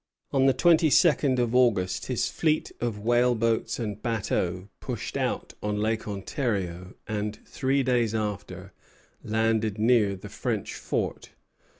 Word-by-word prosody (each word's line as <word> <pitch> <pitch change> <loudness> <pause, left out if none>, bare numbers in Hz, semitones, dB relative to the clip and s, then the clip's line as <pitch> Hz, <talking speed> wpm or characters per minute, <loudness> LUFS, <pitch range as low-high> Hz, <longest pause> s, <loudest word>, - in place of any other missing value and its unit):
On 135 -1 +3
the 135 - +5
twenty 165 0 +4
second 140 -4 +4
of 120 -1 0
August 110 -8 +2
his - - 0
fleet 155 -1 0
of 115 -3 -1
whaleboats 115 0 +1
and 105 -3 -4
bateaux 95 -5 -1
pushed - - -5
out - - -2
on 105 0 -1
Lake 110 +1 -1
Ontario; 95 - -3
and, 105 0 -3
three 135 +1 0
days 120 -3 +1
after, 105 -2 -4 0.5
landed 110 -1 0
near 110 -3 +3
the 95 - -10
French - - -3
fort. - - -3
110 Hz, 130 wpm, -27 LUFS, 105-125 Hz, 0.5 s, the